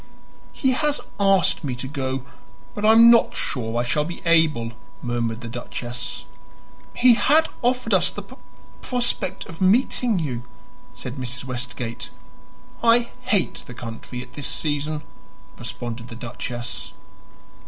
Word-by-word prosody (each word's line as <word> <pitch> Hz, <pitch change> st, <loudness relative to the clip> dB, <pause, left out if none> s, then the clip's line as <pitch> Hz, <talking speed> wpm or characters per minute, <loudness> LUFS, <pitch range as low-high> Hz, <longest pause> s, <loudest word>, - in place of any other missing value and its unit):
"He 265 Hz, -, +1 dB
has 295 Hz, +3 st, +1 dB, 0.2 s
asked 195 Hz, -2 st, +4 dB
me 130 Hz, -4 st, -2 dB
to 125 Hz, +2 st, -4 dB
go, 135 Hz, -2 st, -3 dB, 0.5 s
but 205 Hz, -, -5 dB
I 220 Hz, +1 st, +7 dB
am 230 Hz, +1 st, +9 dB
not 235 Hz, -, +5 dB
sure 115 Hz, -2 st, -2 dB
I -, -, +2 dB
shall 135 Hz, +5 st, +1 dB
be 170 Hz, +3 st, -6 dB
able," 160 Hz, -9 st, +3 dB, 0.3 s
murmured 120 Hz, -1 st, -1 dB
the 120 Hz, -, -6 dB
duchess. 120 Hz, +1 st, -5 dB, 0.7 s
"He 245 Hz, 0 st, +7 dB
had 305 Hz, +7 st, +4 dB
offered 250 Hz, +1 st, +1 dB
us -, -, +4 dB
the -, -, -7 dB
p -, -, -13 dB, 0.5 s
prospect 240 Hz, -6 st, -1 dB
of 165 Hz, -, -11 dB
meeting 225 Hz, +2 st, +3 dB
you," 135 Hz, -8 st, -2 dB, 0.5 s
said 125 Hz, +1 st, -6 dB
Mrs. 125 Hz, -1 st, -4 dB
Westgate. 120 Hz, -2 st, -4 dB, 0.7 s
"I 235 Hz, +1 st, +5 dB
hate 220 Hz, -8 st, +1 dB
the 125 Hz, -, -9 dB
country 120 Hz, +1 st, -6 dB
at 125 Hz, -, -17 dB
this 145 Hz, -, -4 dB
season," 150 Hz, 0 st, -1 dB, 0.6 s
responded 120 Hz, 0 st, -5 dB
the 115 Hz, -, -9 dB
duchess. 120 Hz, 0 st, -5 dB
145 Hz, 140 wpm, -24 LUFS, -, 0.7 s, am